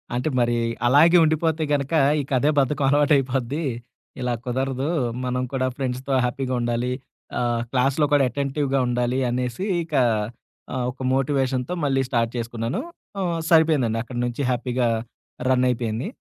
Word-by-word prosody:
అంటే 125 +6 0
మరి 120 0 +2 0.3
అలాగే 160 +7 +6
ఉండిపోతే 160 0 +1
గనక 140 +2 -1 0.3
ఇక 140 - -10
అదే 145 +4 +2
బద్ధకం 140 +1 +1
అలవా‌టైపోద్ది. 140 0 +2 0.6
ఇలా 125 -1 0
కుదరదు. 130 +2 -1 0.4
మనం 125 0 -1
కూడా 130 -1 +1
ఫ్రెండ్స్‌తో 130 0 -3
హ్యాపీగా 130 +1 -2
ఉండాలి. 120 +1 -1 0.5
ఆహ్, 120 -1 0
క్లాస్‌లో 135 +3 +2
కూడా 145 -2 +5
అటె‌న్‌టివ్‌గా 140 +1 -1
ఉండాలి 125 +1 0
అనేసి 125 +7 -2 0.2
ఇక, 160 -2 -13 0.8
ఆ! - - -3 0.2
ఒక 130 - -14
మోటివేషన్‌తో 135 +1 0
మళ్ళీ 135 -2 +2
స్టార్ట్ 115 -2 +1
చేసుకున్నాను. 115 +1 -3 0.4
ఆ! - - -1 0.3
సరిపోయిందండి 155 -9 +3
అక్కడి 125 0 -6
నుంచి 120 +3 -3
హ్యాపీగా 125 0 0 0.6
రన్ 130 -1 +3
అయిపోయింది. 115 - -2
130 Hz, 135 wpm, -23 LUFS, 125-140 Hz, 0.8 s, అలాగే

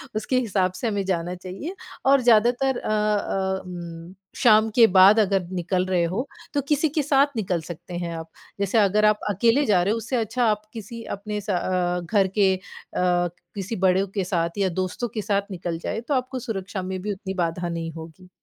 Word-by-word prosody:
उसके 255 +4 +1
हिसाब 195 -6 0
से 235 - -2
हमें 205 -2 -1
जाना 175 -1 -1
चाहिए 185 - -7 0.3
और 275 -1 +5
ज़्यादातर 245 +3 +3
अ - - -5
अ, 205 -3 0
उम, 170 -1 -8 0.2
शाम 220 -1 +5
के 235 - +8
बाद 195 +4 +8
अगर 195 -3 +2
निकल 180 +1 0
रहे 185 -2 +1
हो 245 +8 -2 0.3
तो 285 - +1
किसी 300 +1 +3
के 300 +2 0
साथ 280 0 +4
निकल 185 -6 -1
सकते 175 +2 -9
हैं 170 -1 -3
आप। 160 0 -8 0.3
जैसे 200 +3 +1
अगर 210 +1 +4
आप 210 0 +4
अकेले 230 +8 +3
जा 195 -5 +3
रहे 195 - +1
हो 225 - 0
उससे 230 +3 -3
अच्छा 235 +2 0
आप 210 -2 +2
किसी 230 +1 -8
अपने 210 +1 -5
स 205 - -10
अ, 180 -1 0
घर 195 +2 +2
के 195 -2 +5
अ, - - -9 1.0
किसी 200 +3 -4
बड़ों 190 +1 +3
के 195 - +1
साथ 170 -1 -1
या 195 -2 +2
दोस्तों 185 +6 -2
के 215 0 -4
साथ 200 0 +1
निकल 175 -2 -4
जाए 225 - -3
तो 265 +5 -3
आपको 255 0 -1
सुरक्षा 195 -4 -4
में 185 0 -4
भी 210 +2 -3
उतनी 190 0 -6
बाधा 175 -1 -2
नहीं 165 -1 -4
होगी। 165 +3 -11
195 Hz, 200 wpm, -24 LUFS, 180-225 Hz, 1.0 s, के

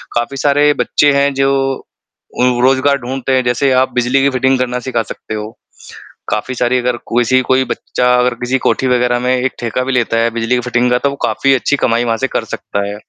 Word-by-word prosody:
काफ़ी 120 +3 -2
सारे 145 +1 +3
बच्चे 145 -1 +2
हैं 140 0 +2
जो 135 0 +1 0.9
उ - - +3 0.2
रोज़गार 135 +2 +3
ढूँढते 130 +1 -4
हैं, 130 -1 +2
जैसे 125 +3 +1
आप 130 0 +2
बिजली 125 +2 +1
की 140 - +3
फिटिंग 130 0 +1
करना 125 0 -1
सिखा 125 -2 -2
सकते 110 - -8
हो। 105 0 -5 0.8
काफ़ी 110 +5 -2
सारी 125 +1 +1
अगर 125 0 -1 0.2
किसी 120 +2 +3
कोई 130 +1 +1
बच्चा 125 0 0
अगर 125 0 +1
किसी 120 +3 -2
कोठी 130 - +1
वग़ैरह 125 -1 +1
में 125 +1 +1
एक 130 +1 -1
ठेका 120 +1 -2
भी 135 - -2
लेता 115 -2 0
है 115 +1 +2
बिजली 115 +2 0
की - - 0
फिटिंग 125 0 0
का 125 - +3
तो 140 - 0
वो 140 - -7
काफ़ी 135 0 +2
अच्छी 145 +2 0
कमाई 120 -2 +1
वहाँ 115 -1 0
से 135 +4 -1
कर - - -2
सकता 100 0 -4
है, 100 - -5
125 Hz, 220 wpm, -15 LUFS, 120-135 Hz, 0.9 s, सारे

